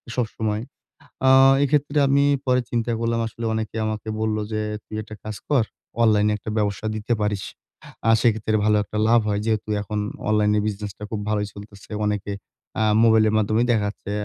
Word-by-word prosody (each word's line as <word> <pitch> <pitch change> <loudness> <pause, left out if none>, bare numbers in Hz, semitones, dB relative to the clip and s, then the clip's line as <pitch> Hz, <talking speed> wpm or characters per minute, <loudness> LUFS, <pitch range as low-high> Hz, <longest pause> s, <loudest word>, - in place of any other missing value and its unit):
সবসময়। 110 -3 -2 0.7
আ - - +7 0.3
এক্ষেত্রে 145 +1 +1
আমি 140 +1 +3 0.2
পরে 125 0 +3
চিন্তা 120 0 -1
করলাম 115 0 0
আসলে 115 +1 -7
অনেকে 110 0 -3
আমাকে 110 0 -4
বললো 110 -1 0
যে, 110 - -1 0.2
"তুই 110 - -8
একটা 110 0 -10
কাজ 110 -1 -5
কর। 140 -6 +4 0.4
অনলাইনে 105 -1 +4
একটা 105 - -8
ব্যবসা 105 0 -1
দিতে 110 +3 -1
পারিস। 105 -2 -1 0.6
আ - - +5
সেক্ষেত্রে 110 -2 +1
ভালো 105 0 +4
একটা 105 +1 -6
লাভ 120 +1 +5
হয়।" 105 -1 0
যেহেতু 110 -1 -1
এখন 105 +1 -3 0.3
অনলাইনে 105 0 +3
বিজনেসটা 105 -1 -5
খুব 110 - -2
ভালোই 105 -1 0
চলতেছে। 100 0 -13
অনেকে 105 -1 -2 0.5
আ - - +3 0.2
মোবাইলের 110 -1 +4
মাধ্যমে 110 +2 +2
দেখা 110 -3 +2
যাচ্ছে, 100 0 -8
110 Hz, 170 wpm, -23 LUFS, 105-115 Hz, 0.7 s, আ